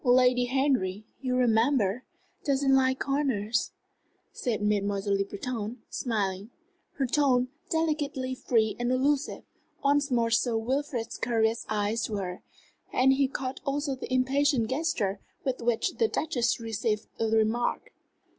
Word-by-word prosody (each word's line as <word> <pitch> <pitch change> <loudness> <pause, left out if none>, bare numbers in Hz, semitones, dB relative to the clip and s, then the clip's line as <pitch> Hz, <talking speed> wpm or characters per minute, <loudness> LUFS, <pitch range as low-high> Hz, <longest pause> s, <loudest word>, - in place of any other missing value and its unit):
"Lady 250 -1 +4
Henry, 245 -7 0
you'll 255 -1 -1
remember, 235 -2 +2 0.4
doesn't 275 -1 +2
like 260 0 +3
corners," 260 -7 0 0.6
said 235 -5 -2
Mademoiselle 200 -1 0
Le 195 - +1
Breton, 220 +3 -4
smiling. 205 -4 -2 0.4
Her 275 - -1
tone, 255 -2 +2 0.2
delicately 295 -5 -1
free 225 -4 +1
and 240 +1 0
allusive, 275 +3 +1 0.4
once 285 0 +3
more 235 -2 +2
drew 230 - +4
Sir 235 -1 0
Wilfrid's 250 0 -2
curious 230 -1 +1
eyes 215 +2 0
to 215 - -3
her, 185 -2 -4 0.5
and 265 +1 +4
he 275 0 +2
caught 260 0 -4
also 280 0 -1
the 260 - -7
impatient 260 -2 +2
gesture 260 - 0 0.2
with 260 -2 -2
which 235 -1 +1
the 455 - +3
Duchess 245 - 0
received 220 -1 -2
the 225 - +1
remark. 220 +2 +1
245 Hz, 135 wpm, -28 LUFS, 220-270 Hz, 0.6 s, Lady